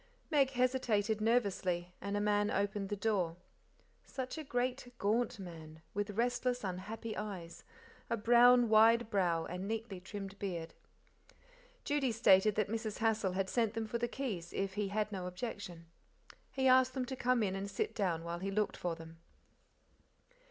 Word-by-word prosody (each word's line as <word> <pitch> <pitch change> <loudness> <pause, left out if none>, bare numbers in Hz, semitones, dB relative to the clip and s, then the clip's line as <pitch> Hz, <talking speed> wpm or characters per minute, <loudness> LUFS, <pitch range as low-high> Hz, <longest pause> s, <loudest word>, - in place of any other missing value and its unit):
Meg 280 -3 +4
hesitated 245 -5 +1
nervously, 190 -6 +1
and 200 +1 -2
a - - +1
man 205 0 +2
opened 200 0 -1
the 205 - -1
door. 190 -5 0 0.7
Such 260 -1 -5
a - - -5
great, 250 -1 -2
gaunt 225 +3 +1
man, 160 -4 -10
with 205 0 -3
restless, 245 +1 0
unhappy 205 +4 -5
eyes, 190 -5 -6 0.5
a 230 - 0
brown, 240 +2 +6
wide 225 +1 +5
brow, 175 -5 +1
and 180 +2 -5
neatly 220 -3 -4
trimmed 195 +1 -8
beard. 170 -5 -4 1.1
Judy 285 -4 +1
stated 210 -2 +5
that 215 -2 +1
Mrs. 220 0 -3
Hassal 220 -4 +1
had 190 0 0
sent 225 0 0
them 225 -1 -1
for 235 +2 -3
the 240 - 0
keys, 215 -10 -4
if 195 -1 -2
he 205 0 -1
had 215 +1 -1
no 185 -3 -4
objection. 180 -3 -6 0.7
He 265 -1 +1
asked 255 0 +5
them 260 -1 -1
to 265 - -5
come 250 -2 +2
in 190 -2 -1
and 195 +1 -4
sit 200 +3 -2
down 180 -7 -1
while 170 0 -4
he 195 +2 -3
looked 210 +1 0
for 175 -2 -2
them. 165 0 -12
210 Hz, 165 wpm, -34 LUFS, 190-235 Hz, 1.1 s, brown